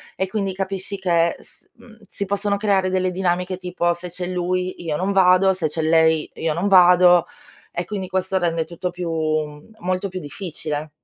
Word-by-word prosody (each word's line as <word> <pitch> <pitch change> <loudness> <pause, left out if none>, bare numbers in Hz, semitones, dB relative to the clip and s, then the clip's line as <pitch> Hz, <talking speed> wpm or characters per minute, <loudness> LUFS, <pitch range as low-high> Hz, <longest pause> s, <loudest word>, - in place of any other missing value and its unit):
e, 190 - -1
quindi, 195 -1 -2
capisci 195 +1 -4
che 170 -3 +1
s - - -17
mhmm, 230 -1 -17
si 200 - -4
possono 200 +1 -1
creare 195 -3 +1
delle 185 0 0
dinamiche, 180 0 -1
tipo: 175 -1 -1
"Se 175 +1 -8
c'è 180 +1 -5
lui, 180 0 -2
io 155 -3 -2
non 185 +5 -1
vado, 190 0 +5
se 175 -4 -1
c'è 160 +2 -3
lei, 160 -1 +3
io 160 -1 -1
non 175 +5 -1
vado, 180 -2 +6 0.5
e 175 - -3
quindi 195 -1 -4
questo 190 0 -1
rende 165 -2 0
tutto 175 +2 -4
più 175 -2 -5
mhmm, 155 +3 -3
molto 185 0 -2
più 185 - -5
difficile". 155 -2 -6
180 Hz, 185 wpm, -21 LUFS, 170-190 Hz, 0.5 s, vado